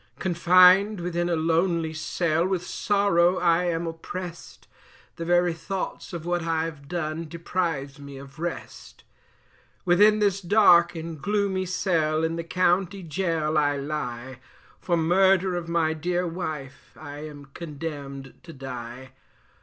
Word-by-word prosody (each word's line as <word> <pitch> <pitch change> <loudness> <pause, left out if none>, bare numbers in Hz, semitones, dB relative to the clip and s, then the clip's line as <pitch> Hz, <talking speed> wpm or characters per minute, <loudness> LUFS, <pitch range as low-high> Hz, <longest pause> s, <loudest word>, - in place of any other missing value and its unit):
Confined 185 +3 +5
within 175 0 -2
a 170 - +1
lonely 165 0 +1
cell, 160 +1 0
with 185 -2 -2
sorrow 190 -3 +2
I 175 0 +2
am 170 -1 -1
opprest, 170 +1 -8 0.5
The 165 - -4
very 175 0 +3
thoughts 190 +4 -5
of 170 -2 -6
what 175 0 0
I've 160 -3 -3
done 165 -1 -3
deprives 165 -4 -3
me 140 -1 -10
of 135 +2 -12
rest; 175 +1 -7 0.8
"Within 205 +4 +5
this 200 -2 +1
dark 175 -3 +5
and 160 -2 -7
gloomy 200 -2 0
cell 160 -4 0
in 165 0 0
the 170 - -4
county 180 +2 0
Gaol 160 -2 0
I 145 -1 +1
lie, 130 -4 -5 0.4
For 175 -2 0
murder 185 +2 +3
of 170 -1 -4
my 165 -2 +1
dear 175 +3 -1
wife 155 -6 -6
I 145 -2 -8
am 145 -2 -11
condemned 145 -4 -7
to 170 -1 -12
die. 130 -1 -8
170 Hz, 135 wpm, -25 LUFS, 155-180 Hz, 0.8 s, Confined